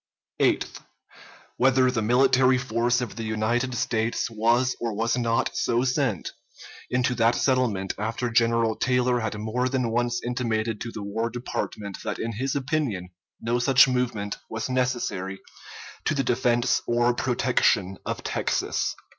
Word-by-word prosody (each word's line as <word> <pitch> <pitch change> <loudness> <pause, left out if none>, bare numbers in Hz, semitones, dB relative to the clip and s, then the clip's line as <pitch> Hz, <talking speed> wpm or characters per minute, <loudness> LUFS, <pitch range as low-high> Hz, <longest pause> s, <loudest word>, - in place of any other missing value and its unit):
Eighth. - - +1 0.8
Whether 130 0 +4
the 115 -3 -1
military 130 +3 +4
force 120 -1 0
of 120 -3 -5
the 115 - -4
United 115 +4 -1
States 115 0 -1
was 120 +3 +2
or 115 -2 -1
was 115 +2 +1
not 115 -2 0
so 120 +1 +1
sent 125 - 0 0.6
into 125 +1 +1
that 115 -1 +3
settlement 120 -8 +1
after 115 +3 -2
General 115 -1 +2
Taylor 125 -1 +1
had 110 -2 -3
more 115 +4 -1
than 125 -3 0
once 120 +1 0
intimated 115 -3 -1
to 120 - -4
the 105 - -6
War 110 +3 -2
Department 110 -4 -5
that - - -3
in 115 - -3
his 130 +6 -2
opinion 130 -10 -1 0.3
no 120 +2 0
such 135 +2 +6
movement 120 -5 -1
was 110 +3 -4
necessary 120 -7 -1 0.7
to 155 - +1
the 135 - +1
defense 120 -1 +2
or 120 +1 +2
protection 120 -6 +1
of - - -4
Texas. - - -1
120 Hz, 145 wpm, -25 LUFS, 110-125 Hz, 0.8 s, such